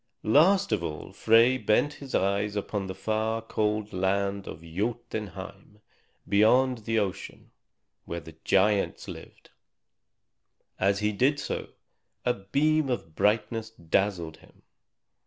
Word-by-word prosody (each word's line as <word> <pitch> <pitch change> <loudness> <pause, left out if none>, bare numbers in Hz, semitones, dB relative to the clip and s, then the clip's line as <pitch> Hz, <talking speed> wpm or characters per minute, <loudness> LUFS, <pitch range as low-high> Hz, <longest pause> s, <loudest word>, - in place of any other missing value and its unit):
Last 185 - +4
of - - +1
all 75 -2 -6
Frey 115 +3 +4
bent 130 +7 +2
his 135 -2 -5
eyes 100 +2 +1
upon 100 -1 -3
the 95 - -6
far, 110 +3 -1
cold 105 -1 -2
land 100 +1 0
of 80 - -8
Jotunheim, 100 +1 -5 0.5
beyond 125 +5 +4
the 115 0 0
ocean, 100 -2 -4 0.5
where 85 - -4
the 80 0 -13
giants 100 +1 +2
lived; - - -11 1.3
and 95 - +3
as 100 0 +1
he 105 0 +1
did 135 +8 +2
so, - - -4 0.6
a 125 - +3
beam 140 +9 +1
of 80 -10 -3
brightness 110 +3 0
dazzled 85 -4 -1
him. - - -22
105 Hz, 125 wpm, -27 LUFS, 95-115 Hz, 1.3 s, Last